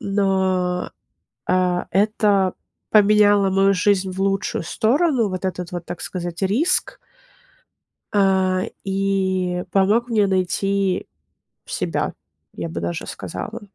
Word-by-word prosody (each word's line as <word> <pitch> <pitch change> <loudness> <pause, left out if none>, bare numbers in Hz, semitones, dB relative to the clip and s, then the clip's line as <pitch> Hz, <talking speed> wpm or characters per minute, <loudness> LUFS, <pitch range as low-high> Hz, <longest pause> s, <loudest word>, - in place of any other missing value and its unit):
но, 190 -2 0 0.6
а 180 -1 +1
это 200 -2 +2 0.4
поменяло 205 -1 +5
мою 195 +1 +3
жизнь 190 0 +1
в 190 - -7
лучшую 195 -2 -1
сторону, 235 - +1
вот 185 0 -4
этот 180 -1 -4
вот, 175 -1 -5
так 175 - -7
сказать, 175 0 -5
риск. 260 - +1 1.1
А, 190 -2 +2 0.2
и 190 -2 0
помог 210 +5 +2
мне 215 -4 +2
найти 195 0 0 0.6
себя, - - -2 0.4
я 85 -2 -4
бы 85 +1 -5
даже 85 0 -4
сказала. - - -6
195 Hz, 110 wpm, -21 LUFS, 185-205 Hz, 1.1 s, поменяло